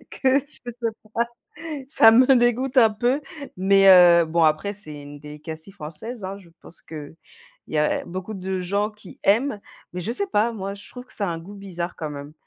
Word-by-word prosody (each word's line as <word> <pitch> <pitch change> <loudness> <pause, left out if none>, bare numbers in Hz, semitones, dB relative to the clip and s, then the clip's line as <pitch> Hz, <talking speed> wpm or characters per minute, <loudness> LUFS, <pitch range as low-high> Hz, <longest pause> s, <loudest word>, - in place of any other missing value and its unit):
que 265 0 +2
je 255 -4 -10
sais 240 +1 -16 0.7
pas, - - -14 0.3
ça 225 -6 +7
me 245 +3 +6
dégoûte 245 +2 +1
un 225 -3 +6
peu, 245 +6 0 0.4
mais 195 +1 +4
heu, 175 -2 +8
bon, 165 +1 +1
après 155 +7 +1
c'est 155 -8 -9
une 145 0 -11
delicacy 155 +3 -9
française, 190 +7 -8
hein. 190 +1 -5
Je 185 -4 -17
pense 170 - -12
qu'il 155 -1 -9 0.5
y 155 - -1
a 150 - +1
beaucoup 185 +4 -6
de 190 -1 -3
gens 200 +4 -1
qui 210 -3 -15
aiment 215 +2 +2 0.3
mais 180 - -5
je 200 - -4
sais 400 +11 -1
pas, 220 - +1
moi, 200 -2 -5
je 200 - -13
trouve 250 0 -10
que - - -11
ça 205 - +1
a - - -1
un 165 - -5
goût 185 +5 -11
bizarre 180 -3 -6
quand 155 -2 -5
même, 145 0 -8
195 Hz, 205 wpm, -23 LUFS, 165-225 Hz, 0.7 s, heu